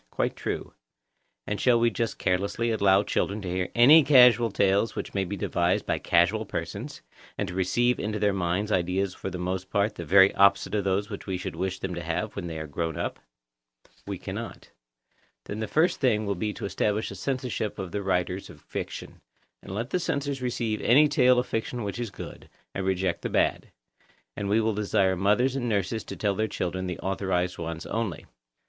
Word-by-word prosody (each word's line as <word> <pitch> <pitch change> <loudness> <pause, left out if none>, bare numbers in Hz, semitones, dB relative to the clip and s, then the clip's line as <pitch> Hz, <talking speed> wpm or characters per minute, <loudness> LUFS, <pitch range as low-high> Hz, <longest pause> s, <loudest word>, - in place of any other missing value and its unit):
Quite - - -1
true. - - -4 0.7
And 105 - -3
shall 120 -2 +4
we 120 0 +3
just 115 +1 -2
carelessly 100 +5 0
allow 100 -2 +4
children 100 0 -1
to - - -5
hear 90 0 -1
any 145 +7 +8
casual 125 -4 +6
tales 100 +2 +1
which - - -5
may 95 -1 0
be 100 +3 -5
devised 85 0 0
by - - -1
casual - - +2
persons, - - -6 0.3
and - - -2
to 90 - -6
receive 120 +7 +1
into 105 +1 -2
their 105 -1 +2
minds 95 +3 -1
ideas 90 +1 0
for - - -6
the 90 - -5
most 90 +1 -3
part 100 +1 +1
the 85 - -7
very 95 +4 +6
opposite 100 +1 +3
of 105 -2 0
those 100 +2 0
which 100 - -7
we 95 -1 -1
should 90 - -5
wish 95 0 -2
them 95 -1 -4
to 85 - -4
have 85 +6 -3
when 90 -3 -4
they 80 -1 -5
are 80 - -4
grown 80 +1 -3
up? - - -3 0.9
We - - -3
cannot. - - -7 0.7
Then 105 - -5
the 110 - -2
first 160 - +2
thing 110 -5 +2
will 100 - 0
be 105 +3 -2
to - - -6
establish 105 +2 -1
a - - -7
censorship 125 -1 -3
of 95 -2 -5
the 105 - -2
writers 95 0 -1
of - - -13
fiction, - - -7 0.4
and - - -10
let 115 +7 -4
the 180 - +1
censors 140 -5 -2
receive 115 -3 -2
any 145 +6 +6
tale 125 -3 +4
of 125 - +2
fiction 115 +1 -3
which 100 +3 -4
is 120 -2 -3
good, - - -10 0.2
and 95 -1 -3
reject 95 -2 0
the - - -3
bad; - - +1 0.7
and 100 -1 -3
we 105 +2 +3
will 110 0 +1
desire 100 -2 +1
mothers 105 +8 +2
and 120 -3 -1
nurses 105 +1 -1
to - - -7
tell 100 -2 0
their 110 +3 0
children 95 -2 -3
the 90 - -4
authorised 95 -2 -1
ones 85 0 -5
only. 110 -6 -3
100 Hz, 205 wpm, -27 LUFS, 95-115 Hz, 0.9 s, any